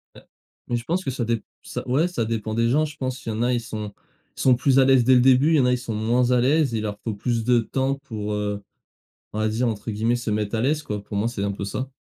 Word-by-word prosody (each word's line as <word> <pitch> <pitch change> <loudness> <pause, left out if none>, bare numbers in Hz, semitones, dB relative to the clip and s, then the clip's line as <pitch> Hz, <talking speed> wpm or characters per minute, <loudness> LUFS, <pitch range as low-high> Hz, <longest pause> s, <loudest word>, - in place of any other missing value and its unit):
Heu, - - -13 0.5
mais 120 - -1
je 120 - -3
pense 175 +8 -1
que 135 - -2
ça 125 -2 -2
dép 115 -2 -1 0.2
ça - - -6
ouais, 145 +8 +2
ça 120 -11 -2
dépend 110 -1 -3
des 115 +1 +2
gens, 150 +5 +3
je 150 - -9
pense. 130 0 -4
Il - - -3
y - - -1
en 110 - -3
a 125 +1 +2
ils 120 - 0
sont 105 -2 -6 0.4
ils - - -5
sont 130 -1 +5
plus 130 +2 +3
à 130 - +6
l'aise 130 -2 +5
dès 130 +2 +5
le 125 - +5
début, 130 +4 +5
il - - +4
y - - +4
en 130 - +3
a 125 - +3
ils 125 - +2
sont 120 -3 -5
moins 120 +3 +1
à 125 - +4
l'aise, 140 +1 +2
ils 110 - -1
leur 105 -1 -4
faut 115 - -2
plus 115 +2 -1
de 120 +1 +4
temps 135 +4 -1
pour, 110 -6 -5
heu, 105 -1 -2 0.7
on 105 - -3
va 110 - +1
dire 120 +3 0
entre 110 0 -3
guillemets 110 +3 +1
«se 120 -2 -4
mettre 105 +1 -1
à 110 - 0
l'aise» 150 +5 +1
quoi, 105 -4 -4
pour 100 - -5
moi 110 - +1
c'est 115 -4 -3
un 100 - 0
peu 100 0 -6
ça. 130 +6 -4
120 Hz, 310 wpm, -23 LUFS, 110-130 Hz, 0.7 s, à